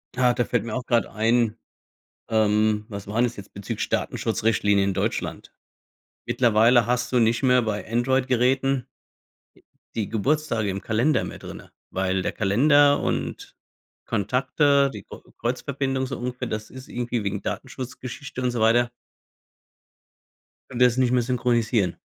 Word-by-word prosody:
Ja, 125 Hz, -1 st, +3 dB
da 120 Hz, 0 st, 0 dB
fällt 120 Hz, -4 st, 0 dB
mir 115 Hz, -1 st, -5 dB
auch 125 Hz, -1 st, -4 dB
grade 120 Hz, -1 st, +1 dB
ein, 115 Hz, 0 st, +1 dB, 0.7 s
ähm, 105 Hz, -1 st, +2 dB
was 100 Hz, -3 st, -7 dB
waren 110 Hz, +4 st, +1 dB
das 120 Hz, -1 st, -2 dB
jetzt, 100 Hz, 0 st, -11 dB
bezüglich 100 Hz, -1 st, -4 dB
Datenschutzrichtlinien 105 Hz, -3 st, +1 dB
in 95 Hz, -, -1 dB
Deutschland? 100 Hz, +4 st, -3 dB, 0.7 s
Mittlerweile 115 Hz, 0 st, +4 dB
hast 125 Hz, +1 st, 0 dB
du 125 Hz, -, +3 dB
nicht 115 Hz, +1 st, +2 dB
mehr 125 Hz, -1 st, +4 dB
bei 110 Hz, -1 st, -3 dB
Android-Geräten 130 Hz, +1 st, +1 dB, 1.1 s
die 110 Hz, -3 st, -2 dB
Geburtstage 115 Hz, -1 st, 0 dB
im 95 Hz, 0 st, -3 dB
Kalender 120 Hz, +9 st, +1 dB
mehr -, -, -7 dB
drinnen, -, -, -10 dB, 0.2 s
weil 95 Hz, 0 st, 0 dB
der -, -, -1 dB
Kalender 145 Hz, +8 st, +4 dB
und -, -, -3 dB, 0.5 s
Kontakte, 135 Hz, +6 st, +2 dB
die 105 Hz, -2 st, -8 dB
Kr -, -, -12 dB, 0.2 s
Kreuzverbindung 135 Hz, +2 st, -2 dB
so 135 Hz, -, -5 dB
ungefähr, 125 Hz, 0 st, -4 dB
das 110 Hz, -1 st, -5 dB
ist 130 Hz, +1 st, -11 dB
irgendwie 120 Hz, -2 st, -3 dB
wegen 100 Hz, 0 st, -3 dB
Datenschutz-Geschichte 130 Hz, +1 st, -6 dB
und 125 Hz, -1 st, 0 dB
so 120 Hz, -, -3 dB
weiter 120 Hz, +2 st, +4 dB, 1.8 s
können 125 Hz, -, -6 dB
das 125 Hz, -1 st, +4 dB
nicht 130 Hz, -2 st, +2 dB
mehr 125 Hz, -, +3 dB
synchronisieren. 120 Hz, -5 st, 0 dB
120 Hz, 140 wpm, -24 LUFS, 110-130 Hz, 1.8 s, Mittlerweile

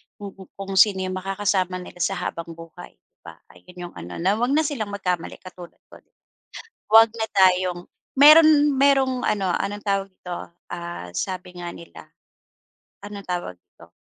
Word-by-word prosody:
kung 200 Hz, -1 st, -9 dB, 0.2 s
kung 195 Hz, 0 st, -7 dB
sino 200 Hz, -4 st, +4 dB
'yong 185 Hz, 0 st, -3 dB
makakasama 190 Hz, -1 st, -1 dB
nila 175 Hz, -, -13 dB
sa 195 Hz, +3 st, 0 dB
habang 170 Hz, -2 st, -5 dB
buhay, 165 Hz, 0 st, -13 dB
'di -, -, -57 dB
ba, -, -, -10 dB, 0.2 s
ayun 180 Hz, -, -18 dB
'yong 175 Hz, -, -9 dB
ano 90 Hz, +1 st, -9 dB
na 200 Hz, +4 st, +1 dB
'wag 245 Hz, +4 st, +1 dB
na 315 Hz, -, +3 dB
silang 270 Hz, -8 st, -3 dB
magkamali 180 Hz, -4 st, -3 dB
katulad 180 Hz, -2 st, -12 dB, 0.2 s
ko. -, -, -14 dB, 0.9 s
'Wag 225 Hz, 0 st, +8 dB
na 220 Hz, -, -1 dB
tayong 185 Hz, -2 st, +3 dB, 0.3 s
meron, 305 Hz, +3 st, +8 dB, 0.3 s
merong 265 Hz, -2 st, +2 dB
ano 195 Hz, -3 st, 0 dB
anong 205 Hz, +1 st, -4 dB
tawag 195 Hz, -1 st, -1 dB
dito, 180 Hz, -1 st, -8 dB, 0.4 s
ah, 170 Hz, -, -7 dB
sabi 180 Hz, -1 st, -5 dB
nga 175 Hz, -1 st, -6 dB
nila 170 Hz, -, -13 dB, 1.0 s
anong 205 Hz, -1 st, -9 dB
tawag 175 Hz, -, -4 dB
dito. -, -, -21 dB
190 Hz, 160 wpm, -23 LUFS, 180-210 Hz, 1.0 s, Wag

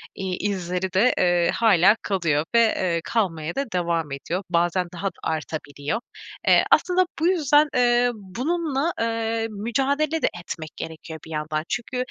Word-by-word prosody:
iii, 190 Hz, -1 st, -3 dB
izleri 180 Hz, -1 st, -3 dB
de, 220 Hz, +7 st, +4 dB
eee, 175 Hz, -1 st, +3 dB
hâlâ 205 Hz, -3 st, +5 dB
kalıyor 165 Hz, -6 st, 0 dB
ve, -, -, +7 dB
eee, 185 Hz, -6 st, +1 dB
kalmaya 170 Hz, -8 st, -1 dB
da 275 Hz, -, 0 dB
devam 170 Hz, -4 st, -1 dB
ediyor. 170 Hz, +7 st, -3 dB
Bazen 175 Hz, +1 st, +1 dB
daha 180 Hz, +3 st, -3 dB
da -, -, -2 dB
artabiliyor. 155 Hz, +3 st, -3 dB, 0.5 s
Eee, -, -, +6 dB
aslında 365 Hz, 0 st, +4 dB
bu 325 Hz, -, +2 dB
yüzden, 300 Hz, -4 st, +4 dB
eee, 245 Hz, 0 st, +3 dB
bununla, 275 Hz, -, -2 dB
eee, 225 Hz, 0 st, -1 dB
mücadele 275 Hz, +9 st, 0 dB
de -, -, +3 dB
etmek 160 Hz, -2 st, -6 dB
gerekiyor 160 Hz, 0 st, -7 dB
bir 160 Hz, -, -11 dB
yandan. 155 Hz, 0 st, -2 dB
Çünkü, 240 Hz, +2 st, -3 dB
190 Hz, 150 wpm, -24 LUFS, 170-245 Hz, 0.5 s, ve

